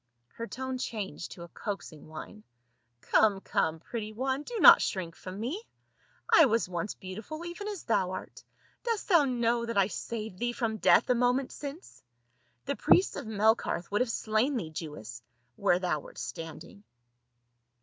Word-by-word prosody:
Her 230 Hz, -, -7 dB
tone 260 Hz, +1 st, -4 dB
changed 210 Hz, -8 st, -4 dB
to 170 Hz, -, -10 dB
a -, -, -9 dB
coaxing 185 Hz, -8 st, -6 dB
whine, 160 Hz, +7 st, -9 dB, 0.3 s
" 120 Hz, 0 st, -46 dB
Come, 205 Hz, -3 st, +5 dB
come, 160 Hz, -4 st, 0 dB
pretty 215 Hz, +5 st, -5 dB
one, 265 Hz, +4 st, -1 dB
do 455 Hz, +9 st, -5 dB
not -, -, +10 dB
shrink 175 Hz, -3 st, -2 dB
from 185 Hz, +2 st, -8 dB
me, 270 Hz, -, -3 dB, 0.7 s
I 325 Hz, -, +9 dB
was 230 Hz, -5 st, +2 dB
once 180 Hz, +2 st, -3 dB
beautiful 220 Hz, -, -7 dB
even 350 Hz, +4 st, -6 dB
as 410 Hz, -4 st, -5 dB
thou 200 Hz, -5 st, +1 dB
art. 185 Hz, -, -7 dB, 0.4 s
Dost 460 Hz, -4 st, -2 dB
thou 340 Hz, -6 st, +6 dB
know 240 Hz, -2 st, +1 dB
that 230 Hz, -, -2 dB
I 200 Hz, -, +6 dB
saved 215 Hz, -4 st, -5 dB
thee 240 Hz, 0 st, 0 dB
from 225 Hz, -2 st, -1 dB
death 235 Hz, -, +5 dB
a -, -, +6 dB
moment 250 Hz, +2 st, +1 dB
since? 290 Hz, +5 st, -8 dB, 0.6 s
The 280 Hz, +1 st, -1 dB
priests 370 Hz, -, +4 dB
of -, -, -5 dB
Melkarth 215 Hz, -4 st, +1 dB
would 205 Hz, -, +2 dB
have 250 Hz, -, +1 dB
slain 230 Hz, +5 st, +1 dB
thee, 165 Hz, -8 st, -4 dB
Jewess, 145 Hz, -7 st, -7 dB, 0.3 s
where 185 Hz, +1 st, +3 dB
thou 180 Hz, -4 st, 0 dB
wert -, -, -13 dB
stand 165 Hz, -2 st, -6 dB
ing." 200 Hz, -, -16 dB
220 Hz, 170 wpm, -30 LUFS, 185-255 Hz, 0.7 s, not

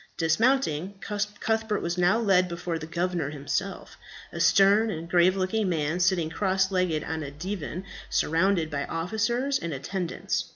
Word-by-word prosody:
Dismounting, 190 Hz, -, +1 dB
Cuthbert 210 Hz, +1 st, -2 dB
was 170 Hz, 0 st, -1 dB
now 180 Hz, +4 st, +3 dB
led 195 Hz, -5 st, +3 dB
before 170 Hz, -1 st, -4 dB
the 155 Hz, -, -7 dB
governor 175 Hz, -2 st, -1 dB
himself, 145 Hz, +6 st, -4 dB, 0.3 s
a -, -, -6 dB
stern 200 Hz, +3 st, +5 dB
and 165 Hz, -4 st, -5 dB
grave 180 Hz, +2 st, +4 dB
looking 190 Hz, +2 st, 0 dB
man, 160 Hz, 0 st, -1 dB
sitting 175 Hz, -3 st, +2 dB
cross 190 Hz, +1 st, +1 dB
legged 180 Hz, -5 st, 0 dB
on 160 Hz, 0 st, -3 dB
a 145 Hz, -, -5 dB
divan 180 Hz, +3 st, -5 dB, 0.2 s
surrounded 165 Hz, 0 st, +1 dB
by 145 Hz, -1 st, -2 dB
officers 225 Hz, +10 st, -1 dB
and 170 Hz, -2 st, -4 dB
attendants. 170 Hz, +6 st, -3 dB
180 Hz, 150 wpm, -27 LUFS, 160-200 Hz, 0.3 s, stern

